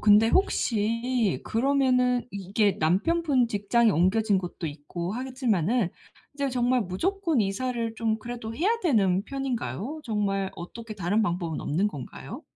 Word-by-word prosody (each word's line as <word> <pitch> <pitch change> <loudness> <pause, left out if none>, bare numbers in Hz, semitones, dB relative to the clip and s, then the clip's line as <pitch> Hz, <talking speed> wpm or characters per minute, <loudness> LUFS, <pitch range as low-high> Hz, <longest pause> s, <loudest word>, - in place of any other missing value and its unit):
근데 210 +2 +6
혹시 230 - +1
그러면은 250 0 +2
이게 200 +1 +1
남편분 255 - +2
직장이 220 +2 +2
옮겨진 200 +4 +3
곳도 180 -2 -5
있고 160 +5 -5
하겠지만은 240 - 0 0.4
이제 280 -1 -1
정말 250 0 +2
무조건 325 - 0
이사를 230 +3 -1
좀 225 -1 0
그래도 235 -1 -6
해야 360 - +1
되는 195 - +3
편인가요? 265 - -4
정말 200 -4 -1
어떻게 215 +6 -8
다른 205 +3 +1
방법은 175 -5 -2
없는 175 +8 0
건가요? 145 -11 -7
220 Hz, 310 characters per minute, -27 LUFS, 195-250 Hz, 0.4 s, 근데